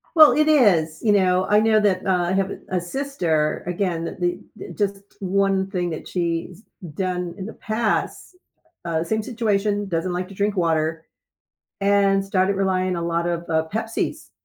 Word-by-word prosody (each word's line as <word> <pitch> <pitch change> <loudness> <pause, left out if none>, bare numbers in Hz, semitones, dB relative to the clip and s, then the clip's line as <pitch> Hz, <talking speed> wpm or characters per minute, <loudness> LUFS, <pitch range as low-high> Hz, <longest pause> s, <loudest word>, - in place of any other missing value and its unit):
Well, 310 -2 +9
it 305 0 +3
is, 185 - +3
you 220 - +2
know, 185 -2 +3
I 210 - +5
know 220 -1 +4
that, 195 -3 +1
uh 185 -2 +2
I - - +1
have 195 0 0 0.2
a 185 -1 -1
sister 175 - -1
again, 180 -2 -1
that 170 - -6
the 175 0 0 0.4
just 200 -1 -1 0.2
one 195 0 +1
thing 180 -3 -2
that 155 - -6
she's 170 +2 -3 0.3
done 180 -2 -2
in 190 - -5
the - - -7
past 220 - -2 0.5
uh, 165 -1 -1
same 220 +6 -1
situation, 210 -3 -1
doesn't 175 +1 -1
like 180 +1 -3
to 195 - -11
drink 205 +1 -1
water. 160 -2 0 0.8
And 200 -1 +3
started 195 0 +1
relying 185 -1 0
a 170 - -3
lot 170 0 -1
of, 170 0 -2
uh, 160 -1 +1
Pepsi's, 225 +1 -3
190 Hz, 170 wpm, -22 LUFS, 170-205 Hz, 0.8 s, Well